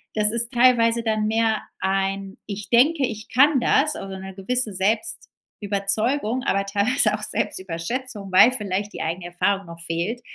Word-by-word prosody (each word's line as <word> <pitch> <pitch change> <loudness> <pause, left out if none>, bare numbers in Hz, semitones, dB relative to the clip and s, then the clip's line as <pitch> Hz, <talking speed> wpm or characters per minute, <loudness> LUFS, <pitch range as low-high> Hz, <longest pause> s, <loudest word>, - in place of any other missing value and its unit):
das 210 0 +6
ist 235 +1 +1
teilweise 235 -2 +3
dann 215 -1 0
mehr 220 0 +1 0.2
ein 195 0 -2
„Ich 205 0 -7
denke, 275 +5 +3
ich 220 -2 -7
kann 280 +1 +4
das“, 295 +5 +2
also 195 0 -7
'ne 190 0 -9
gewisse 220 +2 -1
Selbstüberzeugung, 215 - -2
aber 195 -6 0
teilweise 205 +7 +2
auch - - -8
Selbstüberschätzung, 195 +4 -4
weil 210 +6 +7
vielleicht 205 -3 -3
die - - -6
eigene 170 +2 -4
Erfahrung 185 +3 -1
noch 170 0 -9
fehlt. 170 +9 -2
210 Hz, 150 wpm, -22 LUFS, 195-240 Hz, 0.2 s, weil